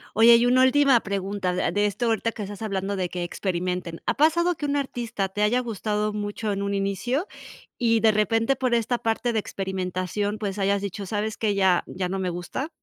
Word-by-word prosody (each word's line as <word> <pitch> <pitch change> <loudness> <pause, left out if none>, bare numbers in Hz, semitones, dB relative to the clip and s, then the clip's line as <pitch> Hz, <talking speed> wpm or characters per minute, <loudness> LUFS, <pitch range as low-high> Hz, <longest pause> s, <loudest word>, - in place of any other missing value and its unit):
Oye, 235 +2 +8
y 240 +1 +3
una 255 +1 +5
última 270 -1 +5
pregunta 195 -2 -2
a 180 - 0
de 205 0 +1
esto 205 +4 -2
ahorita 230 0 0
que 220 - -7
estás 205 +2 -7
hablando 200 -1 -2
de 185 -1 -1
que 175 0 -4
experimenten, 180 -1 -3
¿ha - - +1
pasado 340 +4 +3
que 305 - -7
un 285 0 0
artista 240 -7 -2
te 205 +2 -3
haya 235 +4 +3
gustado 210 -2 -2
mucho 210 +1 -3
en 200 0 -2
un 200 0 -1
inicio 200 - -1 0.5
y 230 -2 +3
de 220 0 +5
repente 225 +4 +2
por 255 -2 0
esta 235 +1 +1
parte 225 +2 -1
de 220 - +2
experimentación, 190 +1 -3
pues 205 -1 -4
hayas 200 0 +1
dicho, 200 0 -5
sabes 210 +2 -2
qué, 210 -2 0
ya 190 -3 +3
ya 180 -1 -3
no 195 - -2
me 185 -1 -1
gusta? 175 - -4
210 Hz, 210 wpm, -25 LUFS, 195-235 Hz, 0.5 s, Oye